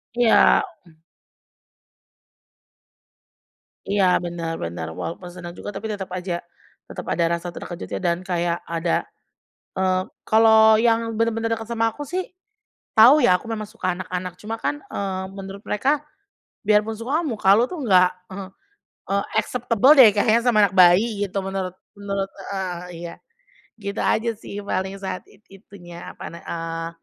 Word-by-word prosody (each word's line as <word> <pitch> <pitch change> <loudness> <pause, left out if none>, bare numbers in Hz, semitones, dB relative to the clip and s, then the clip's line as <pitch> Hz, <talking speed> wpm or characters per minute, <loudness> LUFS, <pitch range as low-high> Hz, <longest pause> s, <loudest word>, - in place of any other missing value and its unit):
Iya, 240 -2 +5 0.2
mmm. 160 -1 -22 2.9
Iya 200 -1 +2 0.2
benar 170 -1 -4
benar, 85 -1 -4
walaupun 165 - -6
senang 175 -1 -8
juga 205 - -7
tapi 210 +3 -5
tetep 200 -2 -4
aja, 180 -1 -3 0.5
tetep - - -8
ada 170 - +1
rasa 175 +1 -8
terkejutnya 175 0 -6
dan 170 -2 0
kayak 175 -2 -1
ada 170 0 -1 0.6
eee, 185 0 +1 0.2
kalau 220 0 +6
yang 225 -1 +1
bener-bener 225 0 0
deket 225 - -7
sama 225 0 +2
aku 290 +6 -8
sih, 365 +5 -3 0.7
tahu 240 +6 +9
ya 180 -5 +5
aku - - -16
memang 215 -1 -4
suka 185 -5 -2
anak-anak 180 -1 -4
cuman 225 +2 -4
kan, - - +1
eee, 190 -1 -3
menurut 195 +1 -8
mereka, 280 +7 +1 0.6
"Biar 210 -1 +6
pun 225 - -3
suka 275 +8 0
kan - - -4
muka 210 -6 0
lu 235 - +4
tuh 350 - -5
nggak, 185 -3 +5 0.2
eee 190 0 -6 0.7
eee, 200 0 +1 0.2
acceptable 245 +2 +3
deh 240 -4 +10
kayaknya 220 +3 +4
sama 230 -3 +4
anak 195 - +1
bayi," 195 +4 +5
gitu 195 - -12
menurut 190 -1 -4 0.2
menurut 200 -1 -3 0.2
heeh, 185 -2 -3 0.2
iya, 170 0 -7 0.7
gitu 200 +1 -5
aja 230 +2 +1
sih 215 - -10
paling 190 -1 -2
saat 185 -1 -4
it 205 - -22
itunya 175 -3 -12
apa - - -12
ne 170 - -9
eee, 165 0 -4
195 Hz, 150 wpm, -23 LUFS, 180-225 Hz, 2.9 s, deh